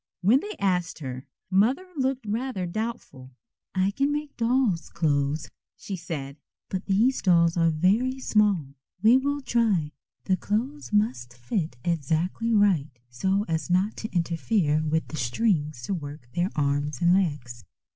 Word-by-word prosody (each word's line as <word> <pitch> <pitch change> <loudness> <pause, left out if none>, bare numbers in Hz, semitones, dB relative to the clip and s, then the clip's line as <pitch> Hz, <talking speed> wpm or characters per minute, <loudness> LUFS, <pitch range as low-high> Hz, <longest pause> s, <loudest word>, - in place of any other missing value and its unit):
When 215 +8 +5
they 420 +6 -6
asked 180 -4 0
her, 130 -3 -7 0.2
Mother 230 - +3
looked 265 -3 -1
rather 220 -2 -2
doubtful. 170 - -5 0.4
"I 190 +1 +2
can 275 +7 0
make 295 -1 -3
dolls' 230 -7 +1
clothes," 150 -3 0 0.3
she 195 - -5
said, 150 -5 -6 0.3
"but 190 0 -4
these 220 +7 +2
dolls 170 -3 +4
are 165 -1 +3
very 205 +12 +2
small. 205 - +2 0.3
We 225 +3 +7
will 285 +2 -1
try. 220 - +1 0.3
The 190 -1 +1
clothes 245 +10 -3
must 125 - 0
fit 155 - -2
exactly 170 - 0
right 200 -9 +3 0.2
so 190 +11 0
as 160 -1 -2
not 185 +4 +2
to 220 - -5
interfere 170 -2 +1
with 160 +1 0
the 155 - -6
strings 150 - 0
to 160 - -2
work 145 -6 -7
their 175 +2 0
arms 145 -1 0
and 175 +1 +4
legs." 145 - -1
180 Hz, 145 wpm, -26 LUFS, 150-220 Hz, 0.4 s, We